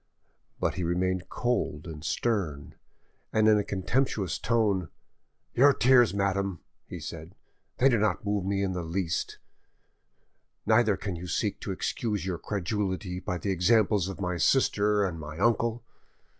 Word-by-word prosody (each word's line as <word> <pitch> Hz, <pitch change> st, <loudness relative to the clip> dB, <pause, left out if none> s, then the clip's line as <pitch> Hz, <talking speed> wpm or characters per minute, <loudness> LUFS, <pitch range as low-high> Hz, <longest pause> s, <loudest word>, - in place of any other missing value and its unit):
But -, -, 0 dB
he 90 Hz, -, -3 dB
remained 90 Hz, +1 st, -1 dB
cold 120 Hz, -11 st, -1 dB
and 80 Hz, -3 st, -8 dB
stern, 80 Hz, -7 st, -2 dB, 0.6 s
and 110 Hz, 0 st, +3 dB
in 105 Hz, -1 st, +6 dB
a -, -, 0 dB
contemptuous 100 Hz, -, -1 dB
tone— 105 Hz, -8 st, +1 dB, 0.6 s
"Your 140 Hz, +3 st, +6 dB
tears, 125 Hz, -2 st, +5 dB
madame," 100 Hz, -2 st, -1 dB, 0.3 s
he -, -, -7 dB
said; 80 Hz, +2 st, -8 dB, 0.4 s
"they 130 Hz, -, +5 dB
do 120 Hz, -5 st, +3 dB
not 105 Hz, 0 st, 0 dB
move 100 Hz, -2 st, 0 dB
me 100 Hz, +1 st, 0 dB
in 95 Hz, -, 0 dB
the 90 Hz, -1 st, -3 dB
least, 85 Hz, 0 st, -2 dB, 1.3 s
neither 110 Hz, -2 st, +3 dB
can 100 Hz, -3 st, -4 dB
you 85 Hz, +2 st, -7 dB
seek 85 Hz, -, -1 dB
to -, -, -5 dB
excuse 105 Hz, -6 st, -2 dB
your 90 Hz, -3 st, -3 dB
credulity 95 Hz, -1 st, -2 dB
by 90 Hz, -1 st, -3 dB
the 100 Hz, +3 st, -2 dB
examples 100 Hz, +1 st, +3 dB
of 95 Hz, -, -6 dB
my 90 Hz, -2 st, -2 dB
sisters 105 Hz, -2 st, +2 dB
and 85 Hz, -3 st, -6 dB
my 75 Hz, 0 st, -8 dB
uncle. 115 Hz, +2 st, +1 dB
100 Hz, 150 wpm, -28 LUFS, 90-110 Hz, 1.3 s, in